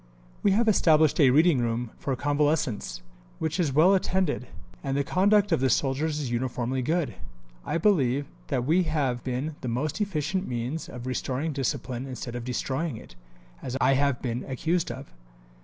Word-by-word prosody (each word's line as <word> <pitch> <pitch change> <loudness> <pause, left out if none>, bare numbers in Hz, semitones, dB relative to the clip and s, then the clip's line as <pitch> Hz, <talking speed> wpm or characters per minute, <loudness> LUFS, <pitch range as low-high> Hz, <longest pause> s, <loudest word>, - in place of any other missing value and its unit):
"We - - +3
have 225 +3 +2
established 160 -7 +4
a 140 -4 +7
reading 155 +2 +5
room 120 0 -1
for 135 - -1
convalescents, 145 - 0 0.3
which 160 +3 -2
is 160 -6 +2
well 160 +8 +5
attended; 185 -8 0 0.4
and 135 0 -1
the 140 - +2
conduct 200 +5 +3
of 165 - +3
the 130 0 +2
soldiers 145 +5 0
is 135 -5 -3
uniformly 125 +1 -1
good. 160 +4 0 0.5
I 165 - -1
believe 145 - +2 0.2
that 125 - -1
we 165 +6 +3
have 140 -6 -1
been 135 +4 -3
the - - -4
most 140 - -2
efficient 185 -1 -1
means 125 +6 -3
of 125 -1 -8
restoring 130 +4 -2
discipline 130 -1 -3
instead 125 -2 -6
of 120 - -4
destroying 130 +3 -2
it, - - -13 0.5
as 130 +1 -4
I 135 +1 +4
have 140 -2 +1
been 120 -1 -2
accused 160 +6 -1
of. - - -9
140 Hz, 170 wpm, -27 LUFS, 125-160 Hz, 0.5 s, a